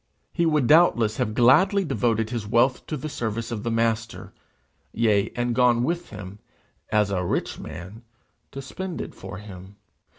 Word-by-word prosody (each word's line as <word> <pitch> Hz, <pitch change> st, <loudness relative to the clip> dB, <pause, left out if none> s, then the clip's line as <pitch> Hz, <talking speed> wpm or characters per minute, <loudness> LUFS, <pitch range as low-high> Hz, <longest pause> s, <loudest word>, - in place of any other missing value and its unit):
He 170 Hz, -1 st, +1 dB
would 150 Hz, -4 st, +2 dB
doubtless 120 Hz, -8 st, +4 dB
have 110 Hz, -, -1 dB
gladly 185 Hz, -, +4 dB
devoted 115 Hz, -6 st, 0 dB
his 115 Hz, -4 st, -4 dB
wealth 120 Hz, +4 st, +2 dB
to 155 Hz, -, -3 dB
the 145 Hz, -, -5 dB
service 115 Hz, -4 st, -4 dB
of 110 Hz, -3 st, -3 dB
the 115 Hz, -, -3 dB
Master, 115 Hz, 0 st, -1 dB, 0.6 s
yea, 105 Hz, -3 st, +2 dB
and 120 Hz, 0 st, -1 dB
gone 120 Hz, -1 st, +3 dB
with 170 Hz, +5 st, -2 dB
him, 100 Hz, -1 st, -9 dB, 0.5 s
as 105 Hz, -2 st, +2 dB
a 90 Hz, -2 st, -1 dB
rich 85 Hz, -, -2 dB
man, 95 Hz, +6 st, -9 dB, 0.5 s
to 135 Hz, -, -7 dB
spend 185 Hz, +6 st, -6 dB
it -, -, -6 dB
for 95 Hz, -, -9 dB
him. 95 Hz, -1 st, -11 dB
115 Hz, 165 wpm, -24 LUFS, 105-135 Hz, 0.6 s, doubtless